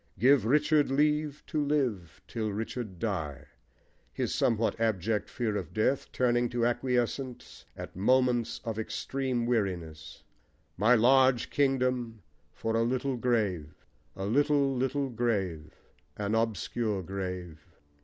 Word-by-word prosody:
Give 130 +1 +4
Richard 150 +3 +3
leave 150 +1 +1
to 150 -1 -1
live 125 - -1
till 110 -3 -3
Richard 110 -1 -5
die! 80 - -3 0.7
his - - -2
somewhat 115 -1 +1
abject 110 -1 0
fear 115 -4 -2
of 90 -3 -5
death, 130 +5 0
turning 120 -1 +1
to 120 -1 0
acquiescence 125 +1 -2
at - - -8
moments 125 +3 +2
of 110 -1 -3
extreme 130 +2 -2
weariness: 85 -10 -3 0.5
My 110 +7 +4
large 130 +1 +4
kingdom 125 -6 0 0.3
for 115 0 -3
a 115 - +3
little 130 +3 0
grave! 105 -11 -1 0.3
A 95 - -4
little 140 +4 +2
little 135 +2 0
grave, 95 -10 -2 0.4
an 105 0 -2
obscure 110 -2 -1
grave! 90 -4 -5
115 Hz, 120 wpm, -29 LUFS, 100-130 Hz, 0.7 s, Give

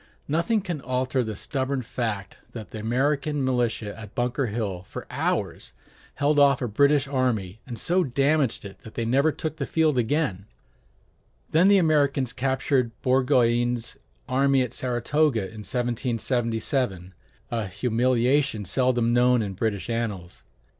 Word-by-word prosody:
Nothing 170 +9 +1
can 175 -7 -4
alter 130 0 0
the 110 -2 -4
stubborn 130 +4 -2
fact 105 -5 -4 0.2
that 110 -3 -8
the 110 - -6
American 140 +5 0
militia 120 -5 -1
at 105 -2 -11
Bunker 125 +2 0
Hill 100 -5 -3
for 95 - -9
hours - - -2 0.4
held 145 +1 +2
off 140 -1 +5
a 125 - -2
British 140 +5 +3
army 115 -8 -1
and 120 -3 -6
so 180 +7 +2
damaged 140 -2 +1
it 100 - -10
that 110 - -13
it 115 -1 -1
never 140 +6 +3
took 155 +1 -5
the 140 - -3
field 155 -5 +2
again; 115 - -1 1.0
then 165 +4 +5
the 200 0 +6
Americans 140 -7 +2
captured 130 -1 0
Burgoyne's 120 -2 +2 0.3
army 135 +1 +3
at 125 - -5
Saratoga 125 +1 +1
in 105 +3 -7
1777, 115 -3 -1 0.4
a 115 -4 -1
humiliation 120 +3 +1
seldom 120 +3 +1
known 125 -1 +4
in 100 -2 -4
British 100 -1 -2
annals. 105 -7 -4
125 Hz, 140 wpm, -25 LUFS, 110-140 Hz, 1.0 s, the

